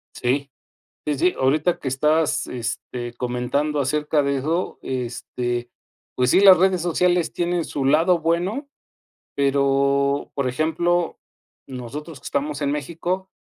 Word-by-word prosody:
Sí, 135 +3 -1 0.5
sí, 150 -1 0
sí, 180 +3 +3
ahorita 150 +6 +2
que 135 - -6
estás, 150 +4 +1
este, 120 0 -5
comentando 125 +5 -1
acerca 150 +2 +1
de 140 0 0
eso, 160 +7 -2
este, 120 -1 -3 0.5
pues 125 0 +2
sí, - - +5
las 195 -2 +9
redes 185 -1 +3
sociales 175 0 +1
tienen 175 0 -1
su 140 -3 -3
lado 165 +5 +4
bueno, 175 - -1 0.7
pero 140 0 +2
por 140 -2 0
ejemplo, 165 +5 0 0.5
nosotros 135 +4 -7
que - - -21
estamos 145 +1 -2
en 140 -1 +1
México 170 +6 -3
145 Hz, 130 wpm, -22 LUFS, 135-170 Hz, 0.7 s, las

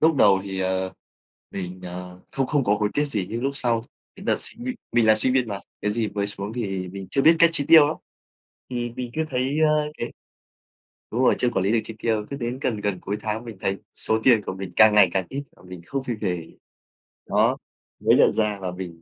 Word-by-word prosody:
Lúc 160 -1 +4
đầu 100 -5 +5
thì, 95 -1 -4
ờ, 95 0 -1 0.6
mình, 90 -1 -6
ờ, 90 0 -8
không 135 -1 0
không 145 -2 +1
có 100 - +3
hối 105 - +2
tiếc 145 - +2
gì, 105 -10 -1
nhưng 115 +2 -3
lúc 135 - +1
sau 115 -4 +1 0.3
cái 195 - -11
đợt - - +2
sinh 235 +3 -3
viên, 255 - -3 0.2
mình 120 -1 +3
là 110 - +7
sinh 125 +4 +3
viên 125 -3 +1
mà, 100 -2 -4 0.2
cái 105 - 0
gì 110 0 -1
mới 100 0 -2
xuống 100 +1 -3
thì 95 -6 -3
mình 95 +1 -8
chưa 135 - +2
biết 165 +1 +6
cách 170 -1 +6
chi 145 -3 +3
tiêu 155 -3 +8
lắm. 155 - -3 0.7
Thì 120 -1 -3
mình 125 -1 -4
cứ 160 - 0
thấy, 135 +3 -1
ơ, 150 -1 +2
cái 120 - -4 1.0
đúng 120 - -1
rồi, - - +4
chưa 125 - +2
quản 105 -6 -1
lý 100 - +2
được 115 - +3
chi 115 - -8
tiêu, 110 -2 0
cứ 140 - -5
đến 120 0 -3
gần 110 -6 -1
gần 100 -3 -2
cuối 100 +3 -4
tháng 110 +2 -3
mình 115 -4 -9
thấy 95 0 -1 0.2
số 110 0 +3
tiền 115 -5 +5
của - - -4
mình 95 -1 -7
càng 110 -1 +7
ngày 100 -4 +7
càng 95 -2 0
ít 140 +1 -4
mà - - -20
mình 90 -1 -10
không 135 +5 -3
kịp 120 -3 -3
để 95 -4 0
ý. 80 -2 -11 0.7
Đó, - - +2 0.4
mới - - +4
nhận - - +5
ra 105 -2 0
là 90 -1 -3
mình 90 -2 -8
110 Hz, 245 wpm, -24 LUFS, 95-130 Hz, 1.0 s, tiêu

